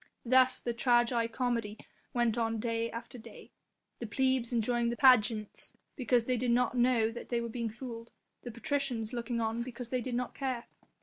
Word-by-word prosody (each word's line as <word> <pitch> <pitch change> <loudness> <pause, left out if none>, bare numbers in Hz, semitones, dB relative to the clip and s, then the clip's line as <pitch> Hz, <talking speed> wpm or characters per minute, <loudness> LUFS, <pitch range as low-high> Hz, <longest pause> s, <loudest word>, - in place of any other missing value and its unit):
Thus 255 +1 +4
the 240 - -3
tragi 240 -1 +2
comedy 230 -3 -2 0.3
went 240 -2 +1
on 225 -1 0
day 230 0 -1
after 235 +2 -8
day. 225 -1 -13 0.5
The 235 - -5
plebs 260 +2 +1
enjoying 235 0 +1
the 235 - -3
pageants 220 -5 +3 0.2
because 245 -3 +1
they 255 0 0
did 245 +1 -1
not 245 +1 +2
know 240 -2 +3
that 235 - -9
they 240 - 0
were 235 0 -4
being 230 0 -3
fooled, 230 0 -8
and - - -38 0.3
the 245 - -7
patricians 255 -4 -2
looking 240 0 -2
on 225 +1 -1
because 240 0 -6
they 255 0 -1
did 245 0 -3
not 250 0 -2
care. 255 -3 -3
240 Hz, 185 wpm, -31 LUFS, 230-250 Hz, 0.5 s, Thus